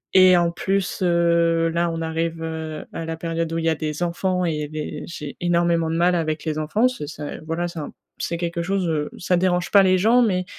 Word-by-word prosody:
et 185 -1 +8
en 170 -1 +2
plus, 190 +2 -1
heu, 170 -1 +3
là 170 +1 0
on 165 - -4
arrive, 165 0 -2
heu, 160 -1 -5
à 165 - -4
la 165 0 -4
période 165 0 -2
où - - -1
il 165 - -2
y - - +4
a 160 - +3
des 155 +2 -3
enfants 180 +1 0
et 150 -3 -2
des 155 0 -5
j'ai 150 -4 -7
énormément 170 -1 +2
de 165 - -1
mal 175 +2 +3
avec 155 -1 -2
les 155 0 -1
enfants. 210 +11 +2
Ce 200 - -5
c'est, 150 -1 -7
voilà, 165 +2 -3
c'est 170 -2 -7
un 145 - -5
p - - -17 0.2
c'est 170 - -2
quelque 170 0 -2
chose, 190 0 -1
heu, 150 -2 -1
ça 180 0 +1
dérange 180 -1 +1
pas 200 - +7
les 185 0 +4
gens, 230 +6 +4
mais 185 -5 +1
170 Hz, 240 wpm, -22 LUFS, 160-180 Hz, 0.2 s, et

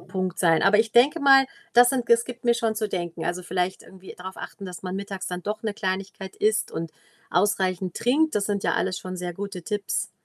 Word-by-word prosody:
Punkt 185 -2 -4
sein. 165 -3 +3
Aber 205 +2 +5
ich 220 -1 +2
denke 275 +7 +5
mal, 270 -2 +6 0.3
das 245 0 +7
sind 250 -3 -1
es 235 0 +5
gibt 245 -1 -9
mir 235 0 +4
schon 225 -2 0
zu 215 -1 -2
denken. 170 -3 -4
Also, 180 +1 -2
vielleicht 180 +1 -2
irgendwie 190 0 -13
drauf 190 +1 -9
achten, 200 -3 -8
dass 180 -1 -8
man 185 0 -4
mittags 195 -1 -5
dann 180 0 -4
doch 210 +2 -4
‘ne 220 -2 -1
Kleinigkeit 190 -1 -4
isst 215 0 +1
und 165 -1 -4 0.4
ausreichend 185 -1 0
trinkt, 305 +6 +2
das 205 - +1
sind 200 -1 -1
ja - - +2
alles 185 - 0
schon 185 0 -7
sehr 180 -1 -4
gute 195 -1 -6
Tipps. 205 +2 -2
195 Hz, 225 wpm, -25 LUFS, 185-225 Hz, 0.4 s, das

